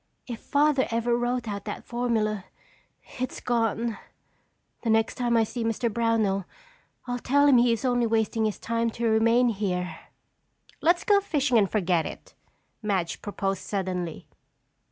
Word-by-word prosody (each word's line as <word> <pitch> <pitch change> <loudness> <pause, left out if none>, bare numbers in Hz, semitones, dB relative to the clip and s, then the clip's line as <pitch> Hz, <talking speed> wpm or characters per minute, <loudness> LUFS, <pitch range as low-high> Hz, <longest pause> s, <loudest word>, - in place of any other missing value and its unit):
"If 235 -3 -6
Father 285 -2 +2
ever 235 +1 +1
wrote 240 0 -1
out 200 -1 -4
that 205 - -5
formula, 220 -5 -1 0.7
it's 255 - -3
gone. 230 -1 -1 0.8
The 230 - -2
next 220 0 +3
time 240 -1 +1
I 225 - +5
see 230 +2 -4
Mr. 225 0 -1
Brownell 220 -4 +1 0.6
I'll 245 -1 -3
tell 285 +4 +3
him 275 -4 +6
he 240 0 +4
is 230 +3 -1
only 245 -2 +2
wasting 220 0 +1
his 215 - -1
time 230 0 -1
to 235 - -1
remain 230 +2 +4
here." 185 -4 -2 0.8
"Let's 345 +2 +3
go 405 -1 +4
fishing 285 - +2
and 200 -3 +2
forget 180 -6 +1
it," - - -10 0.5
Madge 195 -6 -1
proposed 195 -2 -2
suddenly. 180 -4 -3
230 Hz, 150 wpm, -26 LUFS, 205-245 Hz, 0.8 s, him